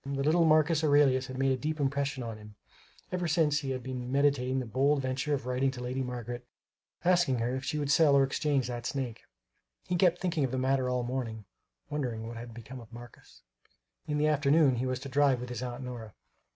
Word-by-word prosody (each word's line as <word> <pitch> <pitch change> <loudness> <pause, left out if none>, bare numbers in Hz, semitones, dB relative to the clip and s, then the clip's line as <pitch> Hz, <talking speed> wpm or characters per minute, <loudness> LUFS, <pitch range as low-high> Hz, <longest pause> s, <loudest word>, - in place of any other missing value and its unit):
The 140 0 -2
little 165 +3 +4
Marcus 155 0 +4
Aurelius 140 -3 +4
had 130 - -7
made 135 0 +2
a - - +2
deep 155 +2 -2
impression 140 -1 -1
on 115 -2 -6
him; 105 0 -13 0.6
ever 180 -1 -1
since 150 -2 +2
he 140 -3 -5
had 130 -2 -3
been 125 -1 -5
meditating 140 -2 +2
the 130 - -3
bold 135 +5 +2
venture 135 +3 -1
of 135 -2 -6
writing 125 +2 +1
to 130 -2 -6
Lady 130 +2 -2
Margaret 120 -1 -5 0.6
asking 175 -7 +3
her 120 +2 -1
if 130 - -4
she 150 - -2
would 145 -1 -1
sell 150 -1 +5
or 140 - +6
exchange 135 -1 0
that 120 -1 -4
snake. 130 -5 -4 0.7
He 180 - 0
kept 175 0 +3
thinking 170 -5 0
of 130 - +1
the 130 - -3
matter 130 0 +1
all 125 -1 0
the 120 - -5
morning, 115 -5 -4 0.5
wondering 120 -6 -3
what 115 - -7
had 120 +1 -8
become 120 +3 -9
of 115 -1 -14
Marcus. 120 0 -13 0.6
In 150 - -1
the 150 - +2
afternoon, 145 -2 +3
he 130 +2 -1
was 130 0 -2
to 140 - -6
drive 135 -1 +3
with 125 0 -6
his 125 -1 -5
Aunt 125 +1 -5
Nora. 120 -4 -8
130 Hz, 220 wpm, -30 LUFS, 125-145 Hz, 0.7 s, or